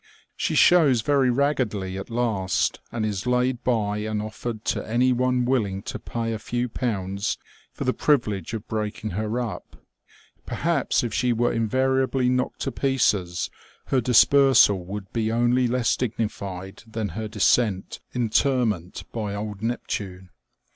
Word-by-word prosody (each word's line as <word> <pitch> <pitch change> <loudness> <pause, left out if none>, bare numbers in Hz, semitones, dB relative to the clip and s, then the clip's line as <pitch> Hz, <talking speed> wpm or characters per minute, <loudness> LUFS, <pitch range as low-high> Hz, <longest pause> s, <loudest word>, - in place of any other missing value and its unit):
She - - -1
shows 150 -9 +5
very 140 -2 +3
raggedly 120 -8 0
at 95 +3 -6
last, 115 -6 0
and 110 -2 -2
is 100 0 -3
laid 125 0 +1
by 105 -4 0
and 110 0 -2
offered 110 +1 -5
to - - -1
any 125 +3 +3
one 125 0 +1
willing 105 -7 0
to - - -5
pay 115 -1 -3
a 110 - -4
few 120 +2 -2
pounds 100 -4 -2 0.3
for - - -5
the 130 -1 +1
privilege 110 - 0
of 110 0 -7
breaking 110 -1 -3
her 110 +5 -2
up. 110 -7 -5 0.7
Perhaps - - 0
if 115 -3 -3
she 125 -2 +2
were 120 +1 +1
invariably 130 +3 +1
knocked 125 0 -1
to - - -1
pieces 105 -10 0 0.4
her 130 - +2
dispersal 125 -4 +5
would 95 +1 -7
be 110 -1 0
only 120 +2 +2
less 120 0 +1
dignified 100 -5 -4
than 110 -2 -3
her 110 +6 -4
decent 105 -1 +1 0.2
interment 115 - 0
by 105 -3 -3
old 105 -1 -5
Neptune. 95 -5 -4
115 Hz, 145 wpm, -24 LUFS, 105-125 Hz, 0.7 s, shows